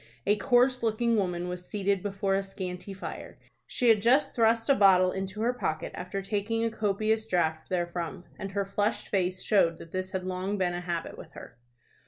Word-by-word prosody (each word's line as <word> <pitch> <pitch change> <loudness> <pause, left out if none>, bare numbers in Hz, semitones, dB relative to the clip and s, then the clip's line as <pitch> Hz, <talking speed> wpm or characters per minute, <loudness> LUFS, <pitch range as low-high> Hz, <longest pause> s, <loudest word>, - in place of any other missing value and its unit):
A 205 - +4
coarse 250 +3 +3
looking 230 +1 +1
woman 180 -4 -1
was 180 0 -5
seated 200 -2 0
before 195 -1 -1
a 195 - +2
scanty 190 -1 -6
fire. 195 0 -7 0.3
She 245 - +1
had 215 -2 +5
just 255 +7 +3
thrust 225 -1 +2
a 280 - +6
bottle 185 -6 +5
into 190 +2 -4
her 240 +2 +2
pocket 155 -9 -3
after 195 +2 -5
taking 215 +3 -1
a 230 - 0
copious 215 +1 0
draught 160 -5 0
therefrom, 175 -1 -3 0.2
and 195 -1 -5
her 200 0 0
flushed 205 +2 -1
face 185 -2 0
showed 170 -5 +3
that 165 - -12
this 185 0 -3
had 190 -1 -3
long 185 +2 -2
been 180 -2 0
a 175 - -3
habit 170 -2 -4
with - - -12
her. - - -11
195 Hz, 195 wpm, -28 LUFS, 180-220 Hz, 0.3 s, a